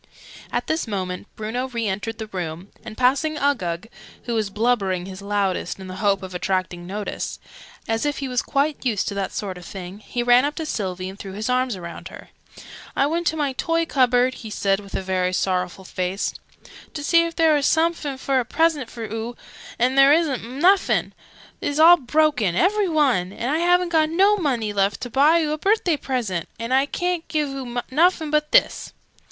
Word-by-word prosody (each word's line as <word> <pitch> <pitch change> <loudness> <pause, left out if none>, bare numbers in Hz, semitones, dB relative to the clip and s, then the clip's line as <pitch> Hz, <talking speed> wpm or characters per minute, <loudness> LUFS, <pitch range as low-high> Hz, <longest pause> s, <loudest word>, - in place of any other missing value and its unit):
At - - -1
this 315 -5 -1
moment 185 -2 -4
Bruno 230 +4 -3
re 235 -3 -3
entered 210 +3 -3
the 220 - -5
room, 180 -2 -6
and 220 -1 -9
passing 280 +5 +2
Uggug 200 - -1 0.4
(who 240 - -3
was 215 -3 0
blubbering 200 -4 0
his 190 0 -8
loudest, 200 -2 -1
in 190 - -8
the 185 0 -7
hope 200 -1 +1
of 185 -1 -7
attracting 180 -1 -2
notice) 205 +2 -4 0.5
as 225 0 0
if 290 -1 -1
he 275 - -3
was 250 -1 0
quite 285 +1 -1
used 225 -7 0
to - - -5
that 200 -1 -3
sort 190 -3 -5
of 175 - -12
thing, 190 +1 -8
he 240 +3 -3
ran 245 +1 +5
up 290 +1 -1
to 320 - -4
Sylvie 185 -9 -3
and 190 +1 -9
threw 195 -1 -7
his 215 +5 -2
arms 250 -4 0
round 170 -1 -8
her. - - -12 0.7
"I 275 - +3
went 335 +3 -1
to 320 - 0
my 285 -3 0
toy 330 +5 0
cupboard," 255 -3 +3
he 225 - -9
said 195 -2 0
with 200 -1 -10
a - - -2
very 185 -1 0
sorrowful 185 0 -1
face, 185 +2 -2 0.6
"to 295 - -4
see 335 +3 +4
if 335 0 -4
there 320 -1 +4
were 295 - +2
somefin 320 -1 +1
fit - - -15
for 270 -1 +1
a - - 0
present 295 -1 +1
for 235 - -8
oo! 225 +2 -5 0.4
And 250 +2 +2
there 275 +1 +7
isn't 305 -6 +1
nuffin! 335 - +2 0.5
They's 285 - -2
all 340 +2 +9
broken, 285 - +1
every 390 - +2
one! 260 - +2
And 240 +6 -3
I 310 - +1
haven't 355 +1 +3
got 315 -2 +3
no 390 +5 +4
money 250 - -1
left, 200 0 +1
to 245 - -5
buy 300 +7 +4
oo 300 - -1
a 305 - -2
birthday 390 -3 +2
present! 235 - -3
And 230 +2 -2
I 270 +2 +3
ca'n't 355 +1 -2
give 300 -2 -1
oo 255 -3 -4
nuffin 320 +1 +2
but 300 0 +1
this!" - - +2
245 Hz, 205 wpm, -22 LUFS, 195-300 Hz, 0.7 s, all